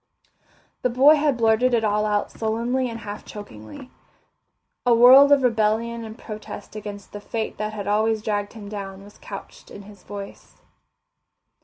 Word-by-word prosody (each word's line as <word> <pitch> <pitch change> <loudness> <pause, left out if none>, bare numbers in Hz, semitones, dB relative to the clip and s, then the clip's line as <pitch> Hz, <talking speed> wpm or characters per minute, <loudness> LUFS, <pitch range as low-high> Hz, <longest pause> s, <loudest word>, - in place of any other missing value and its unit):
The 250 - +1
boy 265 +5 +6
had 290 -3 +1
blurted 230 +2 +3
it 225 - 0
all 210 0 +1
out 210 -1 -1
sullenly 235 +3 -1
and 230 -1 -7
half 205 -1 -7
chokingly. 205 - -11 0.9
A 245 -2 +4
world 260 +4 +8
of 285 -2 +5
rebellion 230 0 0
and 220 0 -9
protest 215 -3 -9
against 205 -1 -8
the 205 - -8
fate 220 +1 -4
that 215 0 -3
had 205 -2 -5
always 215 +1 +1
dragged 205 -2 -2
him 215 -3 -10
down 195 -2 -7
was 205 +1 -16
couched - - -10
in 205 - -11
his 200 -1 -15
voice. 200 0 -10
220 Hz, 160 wpm, -23 LUFS, 205-235 Hz, 0.9 s, world